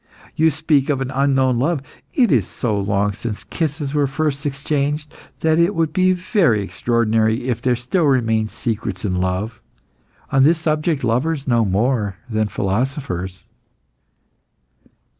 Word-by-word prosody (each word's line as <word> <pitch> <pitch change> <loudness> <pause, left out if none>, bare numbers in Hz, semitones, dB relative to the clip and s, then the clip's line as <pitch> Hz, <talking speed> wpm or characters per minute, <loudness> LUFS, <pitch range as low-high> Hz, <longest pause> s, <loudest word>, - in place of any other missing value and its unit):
You 160 +1 +4
speak 150 -2 +1
of 140 -3 +1
an 135 -1 -3
unknown 135 -2 +2
love. 145 +1 0 0.3
It 245 -6 +4
is 115 -10 +3
so 110 -4 -2
long 100 +1 0
since 105 +1 -5
kisses 150 -3 -3
were 145 -2 +2
first 140 0 -1
exchanged 145 +1 -2 0.3
that 160 0 +3
it 175 +4 +3
would 160 -2 0
be 185 +1 +3
very 180 - +2
extraordinary 110 +4 0
if 120 -3 -1
there 125 -1 +2
still 125 +9 0
remained 115 -5 +2
secrets 110 -5 -3
in 95 - 0
love. 95 +5 -2 0.7
On 135 - +4
this 160 +5 +5
subject 155 -2 0
lovers 135 +5 0
know 120 -2 +3
more 105 +1 0
than 110 -2 0
philosophers." 100 - -3
130 Hz, 140 wpm, -20 LUFS, 110-150 Hz, 0.7 s, this